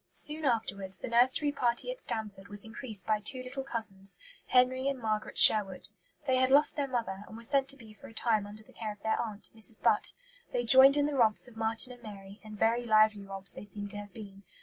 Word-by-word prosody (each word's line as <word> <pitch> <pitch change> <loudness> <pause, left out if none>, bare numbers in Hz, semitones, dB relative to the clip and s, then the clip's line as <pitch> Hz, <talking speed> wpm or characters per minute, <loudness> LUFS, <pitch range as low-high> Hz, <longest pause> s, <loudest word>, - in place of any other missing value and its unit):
Soon 305 +1 -2
afterwards 200 -6 -2
the - - -7
nursery 255 +5 +3
party 245 - -1
at - - -10
Stanford 200 -3 -6
was 205 +1 -6
increased 220 -3 -2
by 215 -1 0
two 255 +4 0
little 260 +2 -6
cousins, 200 -6 -5 0.3
Henry 255 +1 +2
and 275 -1 -1
Margaret 215 -2 -3
Sherwood. 195 -4 +6 0.4
They 260 -2 +1
had 260 0 +2
lost 285 +3 +5
their 285 -2 -2
mother, 225 -6 -4
and 220 - -11
were 230 - -12
sent 275 +2 +2
to 275 - -2
be 220 -4 -15
for 210 - -14
a - - -15
time 215 -3 0
under 210 +1 -9
the - - -21
care 220 -2 -6
of 205 -1 -14
their 220 +1 -1
aunt, 215 -3 -7
Mrs. 220 0 -3
Butt. - - +2 0.4
They 245 -1 -2
joined 265 +4 +7
in 290 - +2
the 295 - -2
romps 230 -3 +1
of 245 - -16
Marten 225 +3 -2
and 245 - -17
Mary, 200 -2 -12
and 215 -1 -11
very 230 +3 +1
lively 215 -2 +3
romps 195 0 -1
they - - -10
seem 205 0 -8
to 205 - -4
have 205 -1 -10
been. 200 -3 -12
225 Hz, 230 wpm, -30 LUFS, 205-255 Hz, 0.4 s, joined